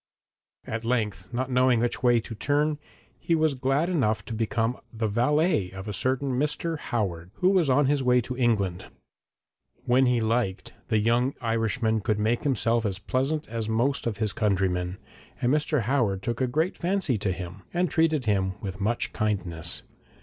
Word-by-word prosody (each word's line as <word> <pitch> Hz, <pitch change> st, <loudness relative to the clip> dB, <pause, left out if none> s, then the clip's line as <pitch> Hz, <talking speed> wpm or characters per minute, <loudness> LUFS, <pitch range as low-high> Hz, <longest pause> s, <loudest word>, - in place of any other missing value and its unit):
At 115 Hz, +1 st, -4 dB
length, 105 Hz, -7 st, -1 dB
not 130 Hz, +2 st, -2 dB
knowing 125 Hz, -1 st, +4 dB
which 120 Hz, +1 st, -1 dB
way 120 Hz, -2 st, +4 dB
to 115 Hz, -, -8 dB
turn, 145 Hz, +6 st, 0 dB, 0.4 s
he 170 Hz, -, +1 dB
was 155 Hz, -2 st, +2 dB
glad 135 Hz, +5 st, +1 dB
enough 130 Hz, -12 st, 0 dB
to 115 Hz, -, -6 dB
become 115 Hz, +2 st, -1 dB
the 110 Hz, -1 st, -2 dB
valet 125 Hz, -, +2 dB
of 95 Hz, +2 st, -8 dB
a 105 Hz, -, -3 dB
certain 130 Hz, +6 st, 0 dB
Mr. 150 Hz, +2 st, -1 dB
Howard, 95 Hz, -, -3 dB
who 180 Hz, -, +3 dB
was 180 Hz, -7 st, +3 dB
on 140 Hz, +2 st, +4 dB
his 140 Hz, +1 st, +2 dB
way 125 Hz, -1 st, +4 dB
to 125 Hz, +2 st, -5 dB
England. 100 Hz, -8 st, 0 dB, 1.0 s
When 130 Hz, +1 st, +4 dB
he 125 Hz, -1 st, +3 dB
liked, 110 Hz, -3 st, -1 dB
the 110 Hz, -, +2 dB
young 120 Hz, +5 st, +2 dB
Irishman 115 Hz, -1 st, 0 dB
could 105 Hz, 0 st, 0 dB
make 110 Hz, +3 st, +1 dB
himself 115 Hz, -3 st, +2 dB
as 100 Hz, -4 st, -2 dB
pleasant 135 Hz, +8 st, -1 dB
as 110 Hz, -1 st, -3 dB
most 120 Hz, +5 st, 0 dB
of 110 Hz, -3 st, -2 dB
his 110 Hz, -3 st, -1 dB
countrymen, 95 Hz, -3 st, 0 dB, 0.4 s
and 125 Hz, +3 st, +2 dB
Mr. 150 Hz, -2 st, +1 dB
Howard 110 Hz, -6 st, 0 dB
took 120 Hz, +1 st, -2 dB
a 130 Hz, -, +2 dB
great 160 Hz, +8 st, 0 dB
fancy 175 Hz, -, 0 dB
to 100 Hz, -2 st, 0 dB
him, 90 Hz, +1 st, -7 dB
and 175 Hz, +1 st, +1 dB
treated 160 Hz, -4 st, +1 dB
him 95 Hz, -3 st, +1 dB
with 100 Hz, -1 st, -6 dB
much 115 Hz, +4 st, -1 dB
kindness. 95 Hz, -7 st, -1 dB
120 Hz, 175 wpm, -26 LUFS, 105-135 Hz, 1.0 s, knowing